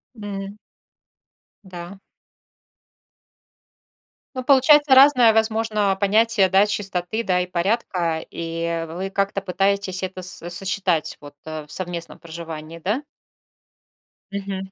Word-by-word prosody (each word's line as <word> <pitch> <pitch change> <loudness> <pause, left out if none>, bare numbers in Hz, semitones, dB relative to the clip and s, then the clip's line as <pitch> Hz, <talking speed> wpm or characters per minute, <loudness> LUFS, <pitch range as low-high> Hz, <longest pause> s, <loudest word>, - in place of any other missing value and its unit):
М. 200 -1 -7 1.1
Да. 180 +1 -10 2.4
Ну, 255 - -4
получается 285 +1 +5
разное, 260 -4 +7
возможно, 220 -3 +1
понятие, 210 -1 +3
да, 195 +2 +4
чистоты, 200 +1 -2
да, 180 -3 +1
и 180 - -3
порядка. 175 -3 -1
И 165 0 -4
вы 185 +4 -5
как-то 195 0 -1
пытаетесь 195 0 -1
это 185 0 -5
со 175 -1 +1
сочетать 185 -2 +1
вот 145 0 -12
в 155 -1 -7
совместном 175 -2 -5
проживании, 165 -1 -9
да? 210 - -1 1.3
Мгм, 195 -1 -5
195 Hz, 100 wpm, -22 LUFS, 170-210 Hz, 2.4 s, разное